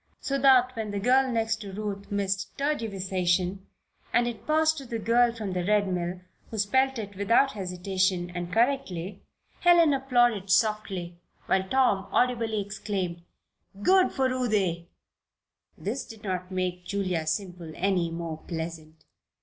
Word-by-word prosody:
So 275 0 -2
that 255 -1 +5
when 220 -2 -3
the 205 0 -3
girl 260 +4 +3
next 225 -1 0
to 205 -3 -8
Ruth 200 0 -5
missed 195 -1 -2
"tergiversation" 195 -9 0 0.5
and 240 0 +3
it 230 -2 -6
passed 315 0 +3
to 270 - -9
the 235 -1 -3
girl 235 +2 +3
from 215 -5 -5
the 180 -1 -1
Red 205 +1 +2
Mill, 180 0 -3 0.3
who 220 - -6
spelled 260 +6 +2
it 205 -3 -6
without 230 +8 +3
hesitation, 185 -2 -1
and 175 0 -5
correctly, 205 -6 0 0.4
Helen 340 -4 +5
applauded 240 -7 +2
softly, 190 -4 0 0.3
while 190 0 +1
Tom 230 -7 +2
audibly 230 -3 +1
exclaimed: 195 -4 -3 0.6
"Good 375 - +5
for 265 -1 +1
Ruthie!" 205 -10 0 0.9
This 240 +7 -3
did 225 0 -13
not 185 -2 -3
make 185 -1 -2
Julia 180 -4 -2
Semple 175 0 -3
any 180 -2 +1
more 165 -1 -5
pleasant. 160 -2 -6
200 Hz, 140 wpm, -27 LUFS, 180-240 Hz, 0.9 s, that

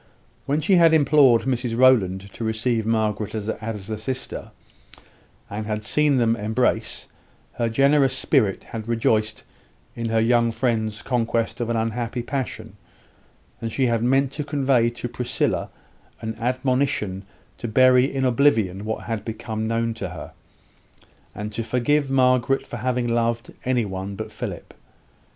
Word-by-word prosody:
When 145 +3 +1
she 190 +3 +4
had 165 -2 +6
implored 140 -5 +5
Mrs 125 -3 -1
Rowland 110 -8 +4
to - - -6
receive 110 0 0
Margaret 110 -1 0
as 105 -1 -4
a 110 -1 -4
sister, 130 +4 -4 1.0
and 105 +1 -5
had 105 0 -3
seen 150 +4 +2
them 115 -2 +3
embrace, 110 0 -1 0.5
her 115 -1 -1
generous 135 +2 +3
spirit 115 -9 +1
had 110 -1 -7
rejoiced 110 -2 0 0.5
in 115 -2 -3
her 110 0 +2
young 115 +1 +3
friend's 110 -3 -1
conquest 115 -1 -1
of 120 - -2
an 120 - 0
unhappy 115 +2 -2
passion; 115 -5 -5 0.8
and 115 -1 -3
she 130 +4 +1
had 115 -2 +1
meant 135 +2 +2
to 150 - -4
convey 135 -5 +2
to 120 +1 -6
Priscilla 120 0 -1 0.5
an 110 0 -5
admonition 125 -5 0 0.4
to 120 - -4
bury 130 +2 +5
in 135 -1 -1
oblivion 115 -7 +2
what 110 0 -3
had 115 -3 -4
become 110 -1 -4
known 115 0 0
to - - -5
her, - - -9 1.0
and 105 +2 -5
to 115 - -2
forgive 135 +5 +1
Margaret 130 0 +2
for 120 - -7
having 125 +1 -1
loved 115 +1 -1
any 125 -3 +1
one 95 0 -5
but 110 +1 -6
Philip. 105 -5 -7
115 Hz, 145 wpm, -23 LUFS, 110-130 Hz, 1.0 s, had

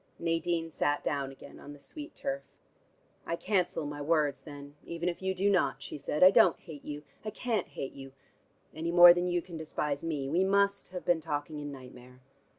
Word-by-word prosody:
Nadine 165 0 -1
sat 145 -1 0
down 140 -2 -2
again 135 +1 -13
on 145 - -10
the 145 - -14
sweet 300 - -10
turf. 275 0 -3 0.9
"I 170 - 0
cancel 180 -4 0
my 145 0 -5
words, 145 -3 +1
then, 145 0 -10
even 170 +1 -4
if 175 0 -2
you 190 0 -1
do 195 +2 +1
not," 185 -8 +2
she 145 - -7
said. 150 +4 0
"I 185 - +10
don't 180 -3 +5
hate 150 -4 -11
you. 150 0 -6 0.2
I 215 - -3
can't 225 +1 -2
hate 140 -2 -6
you, 135 -1 -10 0.6
any 160 +2 -3
more 175 0 +10
than 175 0 -1
you 175 -1 0
can 170 -3 -8
despise 150 -2 -3
me. 150 -5 -2
We 170 +7 +2
must 200 +1 +2
have 180 0 -7
been 175 -2 +2
talking 150 -1 -4
in 145 0 -5
nightmare." 125 -1 -12
165 Hz, 200 wpm, -30 LUFS, 145-180 Hz, 0.9 s, I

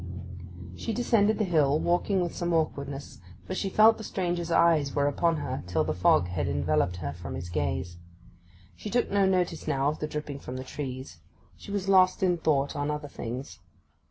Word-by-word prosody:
She 225 - -4
descended 220 -3 +2
the 215 - +1
hill, 155 -6 +2
walking 180 +3 +1
with 175 -2 -3
some 175 -1 -1
awkwardness; 140 - -3 0.2
for - - -4
she 195 +1 -2
felt 220 +3 +5
the - - -6
stranger's 175 -4 -2
eyes 165 -4 +3
were 140 -1 +2
upon 165 +4 +2
her 130 -3 -3
till 80 -3 +1
the - - -1
fog 90 -1 +3
had 90 -1 -2
enveloped 75 +4 +1
her 75 -5 -4
from 85 -1 -7
his 85 +1 -6
gaze. 85 +2 -2 0.8
She 210 - -7
took 245 +3 0
no 200 -1 +3
notice 180 -3 0
now 135 +1 +1
of 150 - -4
the 155 - -2
dripping 150 -2 -5
from 130 -1 -7
the 130 - -5
trees; 130 - -6 0.4
she - - -13
was 200 -1 -2
lost 185 -1 +4
in 180 -2 +2
thought 140 -3 +1
on 145 0 -1
other 150 -1 -3
things. 125 +2 -6
150 Hz, 190 wpm, -28 LUFS, 125-185 Hz, 0.8 s, felt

